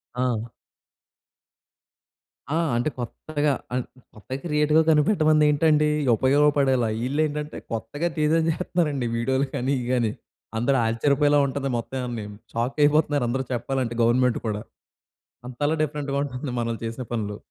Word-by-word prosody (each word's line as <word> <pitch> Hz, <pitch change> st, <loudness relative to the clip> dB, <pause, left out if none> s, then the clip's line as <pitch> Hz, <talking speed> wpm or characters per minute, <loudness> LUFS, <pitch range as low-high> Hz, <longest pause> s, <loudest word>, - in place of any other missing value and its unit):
ఆ! 120 Hz, -2 st, -1 dB, 2.1 s
ఆ! -, -, +2 dB, 0.2 s
అంటే 120 Hz, +5 st, +1 dB
కొత్తగా 145 Hz, +4 st, -2 dB, 0.2 s
అన్ 125 Hz, -1 st, 0 dB, 0.3 s
కొత్తగా 130 Hz, +5 st, -6 dB
క్రియేటివ్‌గా 150 Hz, 0 st, +3 dB
కనిపెట్టమందేంటండి? 155 Hz, -2 st, +3 dB, 0.3 s
ఉపయోగపడేలా. 135 Hz, -1 st, +3 dB, 0.2 s
ఈళ్ళేంటంటే, 150 Hz, +2 st, -1 dB, 0.2 s
కొత్తగా 130 Hz, +9 st, -2 dB
టీ‌జే 155 Hz, +2 st, +3 dB
చేహేత్తన్నారండి 155 Hz, -6 st, 0 dB
వీడియో‌లు 130 Hz, +4 st, 0 dB
కాని, 130 Hz, +3 st, -1 dB
ఇయి 120 Hz, -, -4 dB
గాని. 120 Hz, -4 st, +1 dB, 0.5 s
అందరూ 135 Hz, +4 st, +2 dB
ఆచ్చర్యపోయేలా 145 Hz, +6 st, +3 dB
ఉంటది 135 Hz, 0 st, -3 dB
మొత్తం 125 Hz, +3 st, -5 dB
ఇయన్నీను. 110 Hz, -4 st, -5 dB, 0.2 s
షాకయిపోతున్నారు 145 Hz, +3 st, +2 dB
అందరు 130 Hz, +2 st, -1 dB
చెప్పాలంటే 120 Hz, 0 st, -2 dB
గవర్నమెంట్ 125 Hz, +1 st, +3 dB
కూడా. 105 Hz, -1 st, -2 dB, 0.9 s
అంతలా 145 Hz, +5 st, -1 dB
డిఫరెంట్‌గా 145 Hz, -2 st, -2 dB
ఉంటుంది 130 Hz, -1 st, -5 dB
మ‌నో‌లు 115 Hz, -1 st, -2 dB
చేసిన 115 Hz, +3 st, -4 dB
పనులు. 105 Hz, -3 st, -2 dB
135 Hz, 115 wpm, -24 LUFS, 120-150 Hz, 2.1 s, క్రియేటివ్‌గా